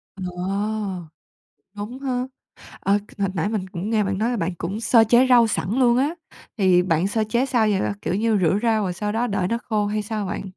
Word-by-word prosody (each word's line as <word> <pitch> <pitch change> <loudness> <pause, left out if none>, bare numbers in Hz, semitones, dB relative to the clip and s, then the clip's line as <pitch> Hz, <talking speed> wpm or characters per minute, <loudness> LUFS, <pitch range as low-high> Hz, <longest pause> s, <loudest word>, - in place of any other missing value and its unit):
Ờ. 190 - -7 1.5
Đúng 210 +6 -7
ha. 255 -2 -2 0.5
Ờ, 200 +1 +2 0.2
hồi 195 -1 +1
nãy 175 +4 0
mình 200 -4 -3
cũng 185 +4 -5
nghe 215 -2 +2
bạn 195 0 -2
nói 230 +3 +1
là 245 - -1
bạn 175 -2 -2
cũng 190 +6 -4
sơ 230 -1 +5
chế 245 +3 +5
rau 240 -2 +6
sẵn 205 -3 -2
luôn 240 -2 +4
á, 285 +5 +1 0.4
thì 185 -3 +4
bạn 170 +1 +1
sơ 220 +1 0
chế 240 +5 0
sao 240 -4 +2
vậy? 195 - +1 0.2
Kiểu 175 - -1
như, 215 +1 +1
rửa 180 +3 +2
rau 220 -2 +2
rồi 185 -2 -1
sau 210 +3 -3
đó 235 +2 0
đợi 200 -4 -1
nó 230 - 0
khô 210 -2 +1
hay 210 +1 -1
sao 210 -1 -3
bạn? - - -4
210 Hz, 220 wpm, -22 LUFS, 190-235 Hz, 1.5 s, rau